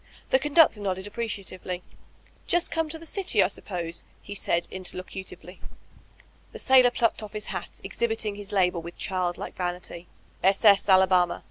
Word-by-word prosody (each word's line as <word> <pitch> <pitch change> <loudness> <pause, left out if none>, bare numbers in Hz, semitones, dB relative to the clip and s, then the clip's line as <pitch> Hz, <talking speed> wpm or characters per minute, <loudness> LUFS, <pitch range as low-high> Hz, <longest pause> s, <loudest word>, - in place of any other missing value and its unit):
The 260 - +5
conductor 295 -6 +4
nodded 190 -1 -2
appreciatively. 200 -4 -5 0.6
^Just 350 0 +2
come 325 -1 -1
to 320 - -5
the 330 - -12
dty, 385 +3 +2
I - - +3
suppose/' 170 -3 -3 0.2
he 205 - -9
said 170 -3 0
interlocutively. 185 -1 -7 0.9
The - - -7
sailor 255 -2 +5
plucked 235 -2 0
off 215 -1 -9
his 210 -1 -4
hat, - - -7
exhibiting 225 -2 -2
his 205 0 -9
label 180 -3 +2
with 170 +1 -10
child 180 -2 -2
like - - -7
vanity: 180 -1 -5 0.3
"S. 195 +3 +2
S. 200 -1 +6
Alabama. 185 -2 +4
195 Hz, 155 wpm, -26 LUFS, 180-230 Hz, 0.9 s, S